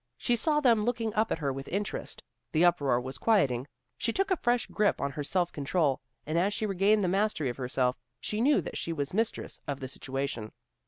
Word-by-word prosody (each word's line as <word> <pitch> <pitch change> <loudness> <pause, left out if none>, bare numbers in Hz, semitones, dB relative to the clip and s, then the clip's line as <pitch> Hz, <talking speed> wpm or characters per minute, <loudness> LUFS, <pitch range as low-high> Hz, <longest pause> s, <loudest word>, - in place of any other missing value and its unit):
She 240 - +1
saw 300 +6 +2
them 235 -7 +4
looking 225 -1 -1
up 220 +1 +1
at - - +1
her 140 -4 -1
with 135 +1 -6
interest. 205 +2 -3 0.3
The 165 +2 +5
uproar 140 -8 +3
was 130 +1 -6
quieting. 140 - +2 0.3
She 230 - +1
took 390 - 0
a - - +5
fresh 240 -6 +1
grip 210 -1 +1
on 140 - -1
her 145 +1 -4
self 175 +3 0
control, 145 -1 0 0.2
and 155 +3 0
as 200 +4 +1
she 215 - -1
regained 200 +1 +3
the - - +2
mastery 190 -6 +1
of 120 - -5
herself, 125 -1 0 0.2
she 210 +1 -2
knew 285 +4 +4
that - - -5
she 165 - -2
was 145 -1 -3
mistress 225 +3 -1
of 140 -1 -3
the 130 - -5
situation. 135 -4 -4
175 Hz, 215 wpm, -29 LUFS, 135-220 Hz, 0.3 s, The